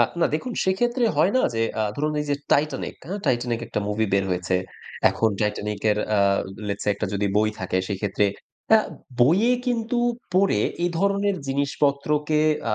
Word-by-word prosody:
আ - - +8 0.2
না - - +5
দেখুন 245 +11 -3
সেক্ষেত্রে 240 +6 +1
হয় 170 +6 +3
না 255 - +3
যে 115 - +1 0.2
আ - - +2
ধরুন 150 +1 0
এই 150 - -3
যে 145 - +3 0.2
'Titanic' 145 -1 0
হা 190 - -3
'Titanic' 120 -2 0
একটা 110 - -2
মুভি 110 +1 0
বের 100 0 +3
হয়েছে। 90 0 -1 0.6
এখন 115 - +1
'Titanic' 105 -1 -2
এর 105 - +1 0.2
আ - - +3 0.5
let's 100 0 -3
say - - +2
একটা - - -3
যদি 100 0 0
বই 110 +1 +3
থাকে 95 0 -2
সেক্ষেত্রে 100 0 0 0.5
আ - - +5 0.4
বইয়ে 190 - +5
কিন্তু 235 -1 -1 0.4
পড়ে, 195 +1 +3 0.2
এই 175 - +1
ধরনের 200 +1 +1
জিনিসপত্রকে 140 +2 0 0.3
আ - - +2
140 Hz, 175 wpm, -24 LUFS, -, 0.6 s, আ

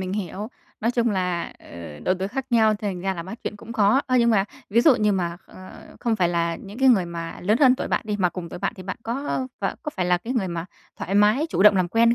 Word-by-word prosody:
mình 185 0 -3
hiểu. 205 +1 -4 0.3
Nói 230 - +1
chung 240 -1 +1
là, 180 -3 -1
ờ, 85 -3 -10
độ 185 - +2
tuổi 190 +1 -2
khác 260 +4 -4
nhau 220 -2 +4
thành 200 -3 -4
ra 190 +1 -1
là 170 - -5
bắt 190 +7 -8
chuyện - - -4
cũng 225 +2 -9
khó. 220 +3 +4
Ơ, 255 -2 +2
nhưng 235 -1 +4
mà 195 -3 +3 0.3
ví 230 +4 +4
dụ 290 0 +6
như 210 -3 +2
mà, 175 -3 -1
ờ, 185 0 -12 0.3
không 230 -2 0
phải 180 -4 +2
là 170 -1 0
những 205 +3 -11
cái 265 0 +5
người 200 -8 +4
mà 170 -1 -6
lớn 210 +6 +2
hơn 260 -3 +7
tuổi - - -4
bạn - - +1
đi, 210 -1 -2
mà 185 -3 +2
cùng 175 -1 -7
tuổi - - -8
bạn - - -1
thì 185 - -9
bạn 185 +4 -5
có, 230 +1 -3
ơ, 260 - -1
ph - - -4 0.2
có 300 - -3
phải 180 -2 0
là 180 0 +3
cái 230 +7 -5
người 220 -8 0
mà 170 -1 -4 0.3
thoải 195 - -4
mái, 210 +9 +4
chủ - - +1
động 210 -1 +7
làm 180 -2 +1
quen 230 +4 +4
200 Hz, 285 wpm, -24 LUFS, 180-230 Hz, 0.3 s, hơn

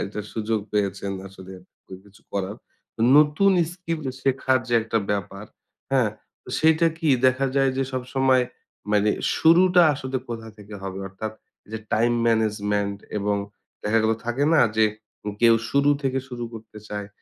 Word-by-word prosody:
এটার 105 +1 -6
সুযোগ 110 0 -1
পেয়েছেন 100 -1 -1 0.2
আসলে 95 0 -12 0.5
কিছু 100 +2 -20
করার। 100 +1 -3 0.6
নতুন 155 +7 +5 0.2
স্কিল 165 -3 -4 0.2
শেখার 130 -1 +2
যে, 120 - +1
একটা 115 0 0
ব্যাপার, 100 0 -3 0.5
হ্যাঁ? 125 -6 +3 0.3
তো - - -16
সেইটা 160 +1 +4
কি 160 - -1 0.2
দেখা 130 +1 +2
যায় 135 -1 +3
যে, 135 - +1
সবসময় 130 0 +2 0.5
মানে 105 0 +3 0.3
শুরুটা 180 +2 +5
আসলে 130 -1 -4
কোথা 115 -1 -6
থেকে 105 0 -11
হবে? 95 0 -5
অর্থাৎ 110 +3 -6 0.4
যে, 110 - -3
টাইম 120 +2 +3
ম্যানেজমেন্ট 105 -3 0 0.2
এবং 100 0 0 0.5
দেখা 110 +2 +2
গেলো 110 0 +2
থাকে 120 +4 0
না - - +5 0.2
যে, 110 - +5 0.6
কেউ 115 -1 +6 0.2
শুরু 140 +1 +3
থেকে 135 0 0
শুরু 120 -2 -5
করতে 110 -1 -11
চায়। 105 -1 -5
115 Hz, 145 wpm, -24 LUFS, 105-135 Hz, 0.6 s, কেউ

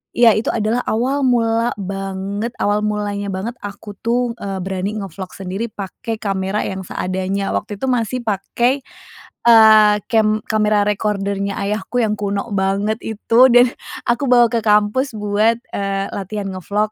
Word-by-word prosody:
ya 235 -2 +6
itu 220 - -1
adalah 225 +2 0
awal 260 +6 0
mula 230 -1 +2
banget, 195 +2 -4
awal 205 +1 +1
mulanya 205 -1 -2
banget 205 +6 -4
aku 205 0 -8
tuh, 240 0 0
eee, 195 -1 -4
berani 195 +3 -3
nge-vlog 185 0 -8
sendiri 195 +4 -4
pakai 205 +4 -5
kamera 195 0 -1
yang 190 0 -4
seadanya 190 +2 -2
waktu 210 0 -3
itu - - 0
masih 250 0 0
pakai, 235 +6 0 0.7
eee, 220 -2 +7 0.2
kem 215 -1 +3
kamera 210 -1 +2
recorder-nya 200 -1 -1
ayahku 210 +4 -2
yang 210 -1 +1
kuno 200 +3 -2
banget 200 +3 0
itu, 225 +3 +4
dan, 245 0 +6 0.4
aku 240 +4 +1
bawa 240 -1 +6
ke 230 - +1
kampus 210 +5 +2
buat, 210 +2 +2 0.2
eee, 195 0 -1
latihan 200 +1 -4
nge-vlog. 205 +3 -2
210 Hz, 145 wpm, -19 LUFS, 195-230 Hz, 0.7 s, eee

